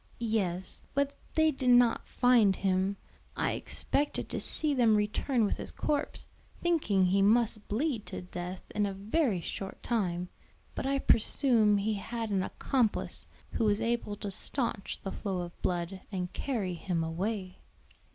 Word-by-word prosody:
"Yes; 185 -4 -1
but 280 0 +1 0.2
they 315 0 +5
did 265 -3 -1
not 245 -1 +5
find 235 -6 +4
him. 190 +1 +1 0.4
I - - +1
expected 290 +1 -1
to - - -2
see 305 -2 -1
them 235 -5 +4
return 215 +3 +1
with - - -1
his - - -3
corpse, 295 0 -2 0.3
thinking 290 - +2
he 190 +2 +3
must 215 +1 +3
bleed 235 0 -1
to - - -5
death 180 +1 -6
in 210 -1 +1
a 195 - -4
very 210 - +1
short 195 +3 -6
time. 180 -6 -1 0.4
But - - -3
I 275 0 +2
presume 225 -4 +3
he 210 +2 0
had 225 +2 -4
an 195 -2 +2
accomplice 235 +3 -1 0.2
who 225 - 0
was 205 0 +3
able 230 -2 -1
to 205 -1 -5
stanch 230 0 -3
the 195 - -3
flow 190 -4 -3
of 175 0 -8
blood 180 +1 -2
and 180 -2 -3
carry 215 -10 -2
him 170 -1 -1
away." 185 +3 -3
210 Hz, 155 wpm, -31 LUFS, 190-245 Hz, 0.4 s, they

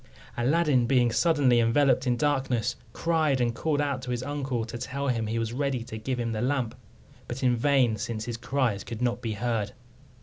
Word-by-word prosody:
Aladdin 135 -1 +2
being 120 -2 +3
suddenly 140 -3 +3
enveloped 130 +3 +3
in 120 -1 +2
darkness, 135 -4 0 0.2
cried, 155 -4 +1
and 120 -1 +1
called 145 +4 -1
out 140 -3 -1
to 125 - -7
his 120 0 -2
uncle 135 -4 -2
to 120 +1 -7
tell 140 +3 -3
him 115 -3 0
he 110 +2 -2
was 115 0 -2
ready 135 -2 -1
to 115 -2 -7
give 125 +3 -3
him 115 -1 -1
the 110 -1 -2
lamp; 130 -3 0 0.5
but 125 +2 -5
in 125 -1 +4
vain, 125 -2 +3
since 110 0 -4
his 120 -1 -4
cries 120 -4 -1
could 115 +1 -5
not 120 0 0
be 115 -3 -2
heard. 110 -1 -2
125 Hz, 200 wpm, -27 LUFS, 115-140 Hz, 0.5 s, in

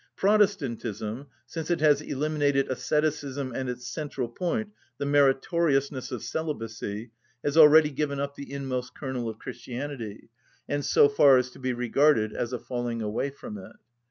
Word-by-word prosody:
Protestantism, 135 - 0 0.2
since 160 +6 -6
it 175 - +1
has 150 -1 +4
eliminated 145 -1 0
asceticism 145 -1 -1
and 130 +1 -3
its 125 0 -5
central 140 -2 -4
point, 195 - -2 0.3
the - - -3
meritoriousness 140 -1 +2
of 125 -4 -5
celibacy, 115 -7 -4 0.3
has 145 - -1
already 155 -1 +8
given 140 0 -2
up 140 0 -2
the 140 0 -9
inmost 130 -3 -4
kernel 130 -4 -3
of 110 - -7
Christianity, 120 -3 -7 0.4
and 145 0 -1
so 140 - +5
far 140 -1 +6
is 125 0 0
to - - -15
be 130 -1 -1
regarded 120 -1 +2
as 120 - -3
a 125 - -2
falling 120 -2 -3
away 110 +6 -1
from 110 -6 -9
it. 95 - -11
135 Hz, 155 wpm, -27 LUFS, 120-150 Hz, 0.4 s, already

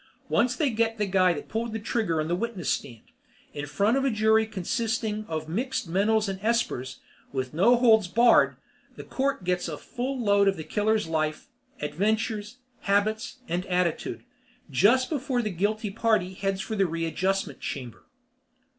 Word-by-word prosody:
Once 250 +1 +2
they 280 0 +1
get 225 0 0
the 210 - 0
guy 185 -2 +3
that - - -5
pulled 225 0 -3
the - - -1
trigger 205 -6 -1
on 155 - -1
the 175 - 0
witness 200 -4 -2
stand, 115 -4 -4 0.5
in 145 0 -5
front 200 - +2
of 270 - +1
a 275 - +3
jury 220 -1 +3
consisting 220 +1 -2
of 155 -1 -4
mixed 240 +6 -2
mentals 210 +5 +2
and 195 -1 -4
espers, 195 - -1 0.3
with 130 -1 -3
no 195 +10 +5
holds 225 -5 +5
barred, 235 +5 +4 0.4
the - - -8
court 275 +1 -1
record 185 - -16
gets 180 0 0
a 155 -3 -5
full 255 - -4
load 200 -3 +3
of 195 - +2
the 160 - -5
killer's 215 +3 +1
life, 155 - -2 0.3
adventures, 215 +7 -1 0.3
habits, 215 +5 0
and 175 +2 -1
attitude; 180 -2 -1 0.5
just 235 - +4
before 265 -5 -1
the 215 - -2
guilty 205 +4 -1
party 210 -4 +1
heads 195 0 -2
for 220 0 -4
the 195 -2 +2
readjustment 165 +4 -1
chamber. 125 -5 -6
210 Hz, 170 wpm, -26 LUFS, 180-230 Hz, 0.5 s, no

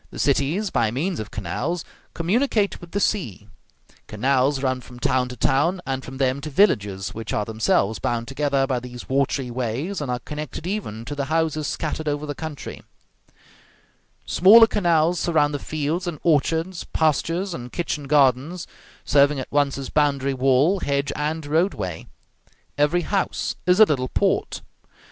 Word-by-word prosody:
The - - -11
cities, 150 +8 +1
by 115 -2 +2
means 165 - -2
of 110 -1 -5
canals, 165 - -3 0.3
communicate 205 +4 0
with 175 - -11
the 200 - -2
sea; 180 - -1 0.6
canals 135 +4 +1
run 130 -1 0
from 125 0 -13
town 125 0 0
to 125 - -7
town, 150 +10 +2
and 135 -1 -3
from 130 +1 -8
them 135 0 0
to 155 - -5
villages, 105 - +1
which 110 0 -6
are 105 - 0
themselves 110 -2 +1
bound 115 +6 -2
together 140 0 0
by 130 -2 -1
these 125 0 -9
watery 135 -1 0
ways, 130 - -3
and 140 - -4
are 125 - 0
connected 150 +4 -7
even 175 - -4
to 140 - -5
the 140 -1 -2
houses 155 -1 0
scattered 155 0 -3
over 145 0 -1
the 145 - -4
country; 155 -1 -7 1.4
smaller 220 +6 +7
canals 175 -5 +2
surround 150 -3 +2
the 145 - -2
fields 155 +5 -2
and 160 -4 -4
orchards, 165 +3 +1
pastures 165 +4 0
and 125 -4 -7
kitchen 160 -4 -3
gardens, 140 +4 +2 0.4
serving 140 0 +4
at 130 - -6
once 145 -2 +1
as 135 -2 -6
boundary 140 -2 +1
wall, 135 +8 +3
hedge, 140 -3 -1
and 155 +1 -2
road 165 +7 +1
way; 90 -5 -5 0.7
every 150 +5 +2
house 195 +2 -1
is 180 +2 +4
a - - +11
little 130 -8 -1
port. - - 0
145 Hz, 160 wpm, -23 LUFS, 130-165 Hz, 1.4 s, a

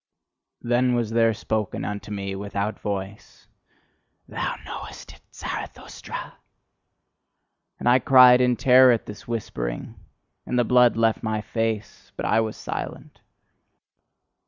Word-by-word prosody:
Then 120 +1 +2
was 115 -2 -1
there 115 0 +3
spoken 110 -1 -3
unto 105 0 -5
me 100 -1 -4
without 100 +1 -4
voice: 100 0 -6 0.8
"THOU - - -3
KNOWEST - - -9
IT, - - -19
ZARATHUSTRA?" - - -7 1.4
And - - -4
I 125 +1 +6
cried 125 0 +7
in 125 -1 +3
terror 130 +1 +6
at 115 - 0
this 105 - -10
whispering, 100 - -4 0.5
and 125 - -1
the 120 - +4
blood 125 0 +4
left 115 -1 +2
my 110 -1 -2
face: 110 -1 -4
but - - -3
I 110 - +3
was 110 -1 -2
silent. - - -7
115 Hz, 125 wpm, -24 LUFS, 105-120 Hz, 1.4 s, cried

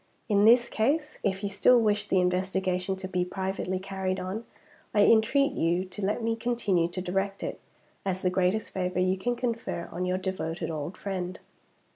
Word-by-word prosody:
In 205 -2 +4
this 240 +1 +6
case, 295 +8 0
if 195 0 -1
you 200 - 0
still 240 +5 +5
wish 210 -2 +1
the 190 - +3
investigation 185 +1 0
to 190 0 -6
be 180 -1 0
privately 190 0 -2
carried 190 0 -3
on, 195 +5 -4 0.5
I 205 - +5
entreat 265 +6 +4
you 175 -4 0
to 185 +2 -8
let 210 +4 0
me 225 0 +1
continue 225 -7 +1
to 175 +2 -5
direct 195 +2 -2
it, - - -4 0.4
as 185 -1 -2
the 180 - +2
greatest 185 +4 +1
favor 180 -1 -2
you 185 +1 +2
can 240 +6 -1
confer 230 -7 -3
on 180 +1 -2
your 180 0 0
devoted 175 -4 -3
old 155 +3 -5
friend. 185 -2 -4
190 Hz, 180 wpm, -28 LUFS, 185-220 Hz, 0.5 s, this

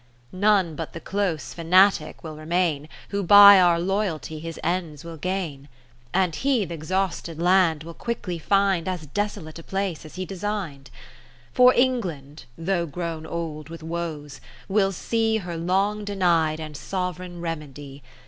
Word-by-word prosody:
None 190 -3 +2
but - - -6
the 165 - -6
close 185 -7 -2
fanatic 180 0 +3
will 155 -2 -7
remain, 155 -1 -1 0.2
Who 200 0 -1
by 200 +1 +9
our 175 -2 +4
loyalty 180 -4 -2
his 165 +1 -7
ends 170 -3 -2
will 165 0 -8
gain; 160 -5 -4 0.4
And 180 -4 +1
he 265 -6 +1
th' 170 - -10
exhausted 170 0 -3
land 175 -3 +3
will 165 +1 -9
quickly 185 -5 -4
find 195 -1 +1
As 180 -4 -3
desolate 180 -1 -4
a - - -11
place 195 -3 -3
as 155 - -12
he 185 0 -4
design'd. 185 - -5 0.6
For 250 0 +7
England 175 - -1
(though 170 0 -1
grown 160 +1 -5
old 160 -3 -5
with 165 -1 -9
woes) 160 -4 -5 0.3
will 195 -1 +2
see 225 +4 0
Her 175 -5 -5
long 195 +5 0
deny'd 170 -6 +1
and 155 -1 -7
sovereign 180 +1 -4
remedv. 145 -4 -7
175 Hz, 150 wpm, -24 LUFS, 160-195 Hz, 0.6 s, by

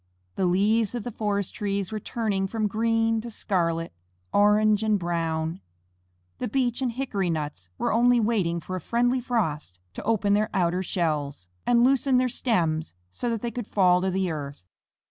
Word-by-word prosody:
The 185 - 0
leaves 210 +5 +2
of 235 - -3
the 245 - -5
forest 205 -3 -2
trees 200 -3 -2
were 215 - -3
turning 205 -3 -1
from 220 +2 -2
green 225 +1 +1
to 235 - -7
scarlet, 170 -6 -1 0.4
orange, 210 +1 +4
and 215 -1 +2
brown. 165 -1 -2 0.8
The 250 - -2
beech 245 +1 0
and 250 -3 0
hickory 225 -8 -2
nuts 150 - -4
were - - 0
only 240 +2 +4
waiting 200 -7 +1
for 185 +4 -5
a 185 - -4
friendly 245 +6 +1
frost 155 - -2
to - - -6
open 205 -2 +2
their 215 +1 +2
outer 180 -1 +1
shells, 150 - -2 0.2
and 240 -1 +5
loosen 265 0 +3
their 255 0 +2
stems, 165 - 0 0.2
so 240 - -3
that 230 -1 -2
they 235 - -2
could 235 -1 -5
fall 180 -2 +3
to 190 - 0
the 190 -1 0
earth. 140 - -6
205 Hz, 175 wpm, -26 LUFS, 175-230 Hz, 0.8 s, and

